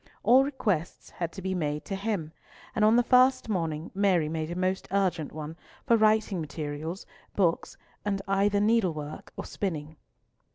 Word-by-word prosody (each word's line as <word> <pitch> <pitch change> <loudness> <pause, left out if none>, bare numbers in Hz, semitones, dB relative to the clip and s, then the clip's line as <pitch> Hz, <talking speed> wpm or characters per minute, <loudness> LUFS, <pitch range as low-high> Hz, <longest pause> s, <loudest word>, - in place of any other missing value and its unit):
All 250 +5 +6
requests 205 - -2
had 170 -2 -4
to 190 - -8
be 190 0 -1
made 150 -4 -2
to 195 - -3
him, 195 -6 -2 0.4
and 215 - +2
on 215 +2 +6
the 245 - +5
first 255 0 +4
morning 165 -5 -2
Mary 185 -6 +2
made 160 0 -3
a 175 - -4
most 185 +1 -1
urgent 185 -6 0
one 155 +1 -6 0.3
for 235 - +5
writing 215 -4 +3
materials, 155 +3 -5 0.3
books, 175 -4 +1 0.3
and 200 -1 -1
either 200 +1 +2
needlework 185 -9 0
or - - -5
spinning. 155 -5 -4
185 Hz, 160 wpm, -28 LUFS, 160-210 Hz, 0.4 s, All